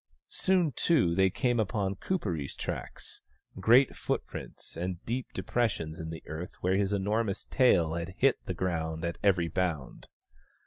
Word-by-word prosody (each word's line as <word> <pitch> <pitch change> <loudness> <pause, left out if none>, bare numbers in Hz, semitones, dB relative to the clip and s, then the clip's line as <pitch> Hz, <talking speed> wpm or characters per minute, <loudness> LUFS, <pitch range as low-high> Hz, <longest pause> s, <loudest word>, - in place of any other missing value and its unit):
Soon, 180 -5 +2
too, 130 - +2
they 95 +1 +4
came 120 +4 +1
upon 100 -2 0
Kuperee's 90 - -2
tracks - - -6 0.2
— - - -16
great 120 +7 +5
footprints - - -5
and 90 0 -4
deep 125 +2 -2
depressions 95 -10 -1
in 80 0 -5
the 80 0 -7
earth 80 +4 -6
where 90 +1 +2
his 100 0 +1
enormous 100 +1 0
tail 90 - +3
had 85 +2 -4
hit 135 -1 +3
the 90 - -3
ground 80 -2 -2
at 85 - -3
every 90 -4 +3
bound. 80 -4 -2
95 Hz, 150 wpm, -30 LUFS, 85-115 Hz, 0.2 s, great